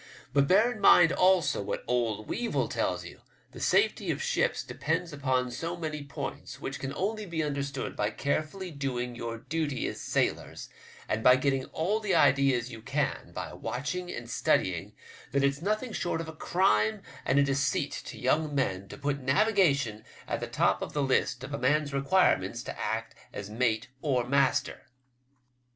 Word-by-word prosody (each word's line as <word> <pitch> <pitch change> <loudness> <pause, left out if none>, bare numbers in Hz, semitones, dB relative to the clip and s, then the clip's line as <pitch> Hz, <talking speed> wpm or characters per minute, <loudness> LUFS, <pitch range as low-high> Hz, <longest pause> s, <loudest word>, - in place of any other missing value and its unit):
But 140 0 +4
bear 210 +8 +5
in 220 - -7
mind 175 -3 +7
also 185 - +3
what 100 - -3
old 115 -3 0
Weevil 240 -1 -1
tells - - -1
you; - - -11 0.3
the - - -10
safety - - +2
of - - 0
ships 485 +1 0
depends 165 0 -2
upon 130 -3 0
so 165 +7 -4
many 155 -3 -4
points, 140 - -6
which 135 - -5
can 135 - -4
only 210 +2 -2
be 165 -2 -1
understood 140 -2 -3
by 105 - 0
carefully 155 - -2
doing 125 -4 -3
your 115 -1 -5
duty 145 +1 -2
as - - -4
sailors, - - -1 0.4
and 110 +1 -1
by 125 - +8
getting 135 0 0
all 195 +7 -1
the 210 -3 0
ideas 135 -3 +3
you 115 - -9
can 135 +6 -2
by - - -6
watching 145 +10 -4
and 120 - -6
studying, - - 0 0.4
that 140 0 +2
it's 140 +1 +1
nothing 215 +5 -1
short 175 -2 -1
of 165 - -4
a 160 - -7
crime 110 - +1 0.2
and 130 - +1
a 140 - +6
deceit 140 0 0
to - - -8
young 155 -2 +1
men 100 -8 -1
to - - -9
put 140 0 -1
navigation 140 - +2 0.2
at - - -2
the - - -4
top - - +1
of - - -5
the 145 - 0
list 130 -1 +1
of 140 +2 -6
a 145 - -2
man's 150 -1 +1
requirements 140 +8 +2
to - - -6
act - - -2 0.2
as 100 0 -7
mate 115 +1 0
or 130 -5 0
master." 140 +1 +1
140 Hz, 175 wpm, -29 LUFS, 125-165 Hz, 0.4 s, by